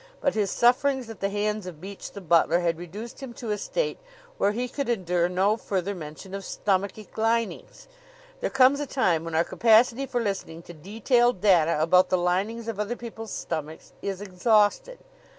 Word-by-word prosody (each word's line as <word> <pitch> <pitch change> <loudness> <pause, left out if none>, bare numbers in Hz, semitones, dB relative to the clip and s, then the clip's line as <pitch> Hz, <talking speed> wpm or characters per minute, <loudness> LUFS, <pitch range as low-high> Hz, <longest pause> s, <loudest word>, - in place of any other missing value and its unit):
But 280 - +1
his 210 -3 0
sufferings 250 +1 +2
at 225 - -11
the 195 - -1
hands 210 -1 -2
of 170 -4 -8
Beach, 195 +3 -8
the 200 - -8
butler, 170 0 +3
had 170 -1 0
reduced 205 +7 -8
him 260 -3 -7
to 235 -2 -5
a 210 - 0
state - - -2 0.4
where 205 - +3
he 245 +4 -2
could 275 +1 -4
endure 180 -6 +1
no 195 +4 +2
further 195 -2 -2
mention 165 +2 -9
of 195 0 -5
stomachic 200 +2 -2
linings. 230 - -1 0.5
There - - -1
comes 270 +1 +4
a 290 - -3
time 180 - +1
when 165 -1 -5
our 165 - +4
capacity 235 +6 +3
for 245 - -1
listening 190 -6 -4
to 175 - -11
detailed 225 - +1
data 170 -6 +4
about 180 +4 +4
the 185 - +2
linings 195 +6 -1
of 225 -3 -4
other 210 +3 -2
people's 225 -2 -8
stomachs 155 -1 -5
is 195 -1 -4
exhausted. 210 - +1
205 Hz, 185 wpm, -26 LUFS, 180-235 Hz, 0.5 s, comes